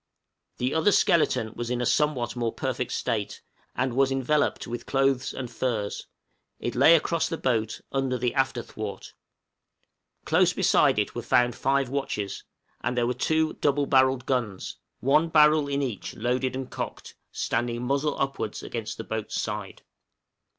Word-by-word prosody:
The 125 +2 -1
other 160 +6 +3
skeleton 130 - +2
was 120 0 -4
in 125 0 -1
a 125 - 0
somewhat 130 -4 +1
more 120 -2 -1
perfect - - -3
state, - - -2 0.3
and 130 -1 0
was 135 +1 +2
enveloped 135 +3 +1
with 120 +1 -6
clothes 135 -1 +1
and 130 - -5
furs; 110 -4 -2 0.5
it - - -3
lay 165 - +7
across 165 0 +1
the 165 - -3
boat, 115 -6 -1
under 135 -2 0
the 125 0 -1
after 130 -3 0
thwart. 105 -2 -7 1.1
Close - - +3
beside - - +3
it - - 0
were - - -4
found 120 0 +2
five 135 0 +1
watches; 120 -7 -3 0.4
and 125 +2 -1
there 120 - +2
were 125 - 0
two 160 +3 +1
double 145 0 +2
barrelled 130 -1 +3
guns 115 -8 -2 0.2
one 150 +5 +3
barrel 150 -1 +5
in 140 0 -1
each 115 -8 -4
loaded 125 +2 -1
and 130 -1 -5
cocked - - -6 0.2
standing 120 +1 -2
muzzle 140 +4 0
upwards 135 -6 -2
against 115 -3 -5
the - - -5
boat's 110 -1 -3
side. - - -5
130 Hz, 155 wpm, -26 LUFS, 120-140 Hz, 1.1 s, lay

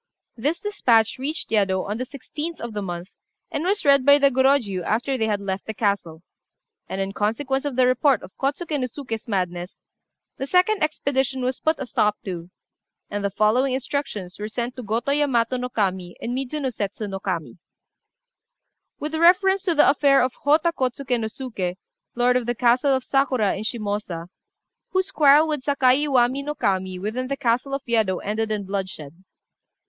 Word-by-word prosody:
This 290 +8 -1
despatch 245 - +2
reached 295 +1 -3
Yedo 195 -3 +2
on 210 +3 -3
the 255 - -3
16th 300 +5 -6
of 235 -1 -6
the 210 - -3
month, 175 -1 -5 0.4
and 295 - -2
was 395 +1 0
read 280 -2 +5
by 285 +1 +7
the 280 -1 +4
Gorôjiu 260 -7 +2
after 245 +8 0
they 220 -3 0
had 210 -2 0
left 195 -1 -4
the 220 - -4
castle; 200 -6 -1 0.7
and 190 - -4
in 195 0 -1
consequence 265 +7 -1
of 285 -3 -2
the 255 0 +4
report 255 0 +3
of - - -12
Kôtsuké 290 +2 -2
no 255 - -1
Suké's 240 -4 -6
madness, 180 -3 -3 0.5
the 270 - -4
second 370 +6 +3
expedition 270 -4 0
was 255 0 -1
put 315 0 +1
a 270 - -4
stop 210 -3 +1
to, 175 -3 -5 0.6
and 205 0 -3
the 200 - +1
following 220 +7 +2
instructions 245 -9 -4
were 210 - -3
sent 240 +3 -3
to 255 - -6
Gotô 235 +5 -1
Yamato 255 -4 +1
no 250 0 -3
Kami 190 -6 -2
and 240 +1 -3
Midzuno 270 0 -3
Setsu 205 0 -4
no 195 -1 -5
Kami 180 -3 -4 1.4
"With 300 +2 -4
reference 370 +4 +4
to 345 -4 +1
the 295 - +6
affair 275 -1 +4
of 255 0 -1
Hotta 310 +4 +4
Kôtsuké 255 -2 -1
no 220 - -2
Suké, 215 -7 -4 0.4
lord 245 +1 +3
of 250 -2 0
the 240 - 0
castle 250 +4 +3
of 260 - -2
Sakura, 260 -7 +1
in 195 - -5
Shimôsa, 205 -6 -3 0.6
whose 375 0 0
quarrel 295 +1 +6
with 300 -3 -2
Sakai 275 0 +3
Iwami 260 -1 +2
no 295 +1 -4
Kami 190 -4 -1
within 220 +7 -3
the 275 +1 -3
castle 250 +3 0
of 275 - -5
Yedo 220 -6 +1
ended 215 +2 -2
in 210 -2 -2
bloodshed. 185 -7 -4
245 Hz, 180 wpm, -23 LUFS, 205-280 Hz, 1.4 s, by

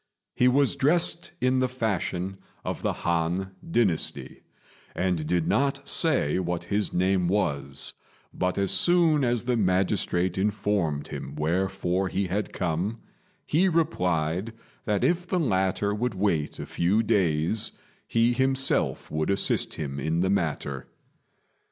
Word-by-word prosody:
He 125 - +3
was 135 +2 +3
dressed 165 +3 +1
in 130 +1 +2
the 130 0 +1
fashion 95 -5 -2 0.3
of - - -3
the - - 0
Han 85 +3 0 0.2
dynasty, 110 - 0 0.5
and 90 -4 0
did 85 -1 +1
not 140 0 +1
say 140 - +2
what 85 -1 -2
his 105 0 -1
name 95 0 +1
was; 70 -8 -1 0.4
but 90 0 -1
as 100 -1 +1
soon 170 -4 +3
as 120 -2 +1
the 125 0 +1
magistrate 95 -2 +1
informed 100 -7 0
him 70 - -6
wherefore 90 +3 0
he 95 +2 -1
had 100 +4 -2
come, 90 +5 -2 0.5
he 180 +5 +3
replied 90 - 0 0.3
that 105 -2 0
if 175 +1 +1
the 180 0 0
latter 100 - +1
would 115 +1 -2
wait 90 -6 0
a - - -5
few 100 +6 +1
days 90 0 +1 0.3
he 115 +1 +3
himself 135 +1 +1
would 80 +2 -1
assist 100 0 +1
him 70 -3 -4
in 80 +4 0
the 95 +1 +1
matter. 75 -7 -2
95 Hz, 135 wpm, -26 LUFS, 85-120 Hz, 0.5 s, He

